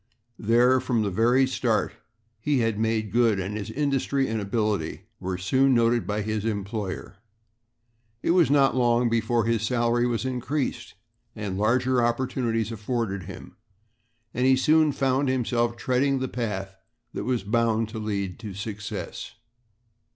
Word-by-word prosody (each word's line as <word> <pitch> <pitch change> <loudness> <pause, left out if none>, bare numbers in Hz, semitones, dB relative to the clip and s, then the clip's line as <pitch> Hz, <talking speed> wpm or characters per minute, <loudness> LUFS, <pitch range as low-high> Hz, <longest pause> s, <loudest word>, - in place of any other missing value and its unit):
There 120 +4 +4
from 120 -3 0
the 100 - -1
very 120 +7 +3
start 120 -4 0 0.5
he 145 +5 0
had 115 -2 0
made 110 -2 0
good 115 -3 +3
and 95 +3 -3
his 110 0 -5
industry 140 0 0
and 110 -1 -2
ability 105 -5 -1 0.2
were 90 0 -3
soon 130 +8 +2
noted 115 0 +2
by 105 0 -1
his 110 0 -2
employer. 100 -2 -4 1.1
It - - +2
was 175 -4 +4
not 140 -2 +4
long 120 -1 +3
before 115 0 +1
his 115 -2 +1
salary 120 +1 +1
was 120 0 -1
increased 130 -1 -3 0.4
and 105 -4 -4
larger 125 +4 +2
opportunities 120 -2 -1
afforded 105 -4 -3
him, - - -10 0.8
and 125 +1 +1
he 130 - +6
soon 155 +3 +4
found 135 0 +1
himself 120 -2 0
treading 130 +3 +1
the 130 0 -2
path 100 -6 -4 0.4
that - - -4
was 125 -4 0
bound 115 +1 +1
to 110 0 -6
lead 100 -3 -3
to 105 -4 -7
success. 105 0 -6
115 Hz, 145 wpm, -25 LUFS, 105-130 Hz, 1.1 s, he